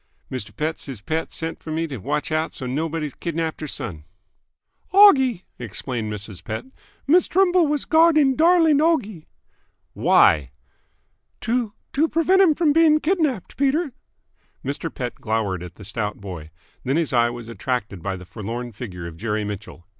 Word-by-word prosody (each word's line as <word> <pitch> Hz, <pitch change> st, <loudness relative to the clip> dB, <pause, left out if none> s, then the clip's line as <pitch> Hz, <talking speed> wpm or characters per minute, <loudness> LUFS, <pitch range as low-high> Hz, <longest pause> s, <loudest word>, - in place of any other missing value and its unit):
"Mister 105 Hz, -5 st, -5 dB
Pett, 155 Hz, +9 st, -3 dB
siz 135 Hz, -6 st, -7 dB
Pett 160 Hz, +10 st, -3 dB
sent 165 Hz, 0 st, -5 dB
f'r 160 Hz, -, -8 dB
me 160 Hz, +1 st, -1 dB
t' 145 Hz, -4 st, -6 dB
watch 145 Hz, +10 st, -2 dB
out 155 Hz, +1 st, -1 dB
so's 130 Hz, -, -5 dB
nobody 155 Hz, +1 st, -2 dB
kidnapped 165 Hz, -2 st, -3 dB
her 155 Hz, -, -4 dB
son." 105 Hz, -, -6 dB, 0.9 s
"Oggie," 265 Hz, -, +6 dB, 0.2 s
explained 115 Hz, -1 st, -4 dB
Mrs. 105 Hz, -3 st, -6 dB
Pett. 110 Hz, -, -5 dB, 0.4 s
"Miss 345 Hz, +6 st, +4 dB
Trimble 365 Hz, -2 st, +3 dB
was 295 Hz, -1 st, -1 dB
guarding 315 Hz, -4 st, +5 dB
darling 325 Hz, -2 st, +5 dB
Oggie." 235 Hz, -, 0 dB, 0.7 s
"Why?" 70 Hz, -4 st, +4 dB, 0.9 s
"To 230 Hz, -2 st, -1 dB, 0.2 s
to 310 Hz, +4 st, +3 dB
prevent 340 Hz, 0 st, +4 dB
him 310 Hz, -4 st, +4 dB
being 315 Hz, -1 st, +5 dB
kidnapped, 305 Hz, -, -1 dB
Peter." 280 Hz, +1 st, +1 dB, 0.7 s
Mr. 145 Hz, +4 st, -3 dB
Pett 125 Hz, -2 st, -4 dB
glowered 105 Hz, -5 st, -1 dB
at 90 Hz, -1 st, -9 dB
the 105 Hz, -, -12 dB
stout 105 Hz, +1 st, -3 dB
boy. 90 Hz, -6 st, -8 dB, 0.3 s
Then 135 Hz, +4 st, 0 dB
his 165 Hz, -5 st, 0 dB
eye 120 Hz, -1 st, +4 dB
was 120 Hz, -1 st, -8 dB
attracted 115 Hz, -5 st, -3 dB
by 95 Hz, +1 st, -3 dB
the 90 Hz, -, -11 dB
forlorn 115 Hz, +7 st, -6 dB
figure 95 Hz, -6 st, -7 dB
of 85 Hz, -1 st, -8 dB
Jerry 105 Hz, +1 st, -2 dB
Mitchell. 105 Hz, -4 st, -7 dB
155 Hz, 155 wpm, -23 LUFS, -, 0.9 s, Oggie